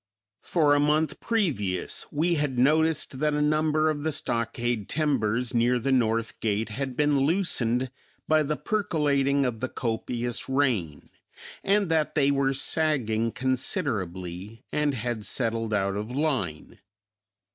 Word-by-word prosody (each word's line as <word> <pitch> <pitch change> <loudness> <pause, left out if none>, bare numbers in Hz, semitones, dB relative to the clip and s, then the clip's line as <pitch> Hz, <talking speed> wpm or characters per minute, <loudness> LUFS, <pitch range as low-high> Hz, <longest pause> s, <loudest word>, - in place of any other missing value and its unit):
For 150 -4 +2
a 145 - +4
month 150 0 +1
previous 130 - -1
we 165 +4 +1
had 145 -5 -1
noticed 155 +1 +2
that 150 0 +1
a - - 0
number 155 +1 +2
of 155 -2 0
the 160 +1 -1
stockade 115 -4 -2
timbers 125 -5 0
near 120 +1 +3
the 135 +3 -1
north 115 -3 +1
gate 110 0 -1
had 130 +3 -4
been 145 -1 +3
loosened 130 -6 0 0.4
by 155 0 +4
the 150 0 -1
percolating 145 -9 +1
of 120 -3 -2
the 130 +2 -2
copious 120 +1 -3
rain 120 - 0 0.5
and 200 0 +2
that 155 -2 +1
they 140 -2 +3
were 135 -1 +1
sagging 125 -7 +1
considerably 110 - -3
and 150 -2 +1
had 120 -2 -3
settled 115 +1 -1
out 100 -2 0
of 105 +2 -4
line. 125 - -2
130 Hz, 135 wpm, -26 LUFS, 115-150 Hz, 0.5 s, a